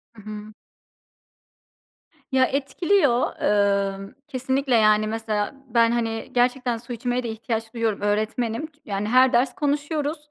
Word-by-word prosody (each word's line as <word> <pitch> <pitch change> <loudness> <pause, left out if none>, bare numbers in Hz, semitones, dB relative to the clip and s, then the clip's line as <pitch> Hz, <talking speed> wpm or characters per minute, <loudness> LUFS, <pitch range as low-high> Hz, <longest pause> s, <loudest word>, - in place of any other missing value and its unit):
Hı 210 - -13
hı. 210 0 -8 1.8
Ya, 260 -1 +4
etkiliyor. 280 0 +1
Eee, 200 +1 +1
kesinlikle, 260 0 0
yani, 215 -1 +4
mesela 220 +1 -2
ben, 230 -1 +3
hani, 225 -1 -2
gerçekten 245 -1 +1
su 240 +1 -8
içmeye 245 +2 -2
de 235 - -3
ihtiyaç 225 0 -4
duyuyorum, 225 -3 -1
öğretmenim. 220 +5 -1
Ç 295 -2 -30
yani, 200 0 -2
her 255 +3 +5
ders 245 +1 +2
konuşuyoruz. 295 +1 -1
235 Hz, 130 wpm, -24 LUFS, 215-260 Hz, 1.8 s, her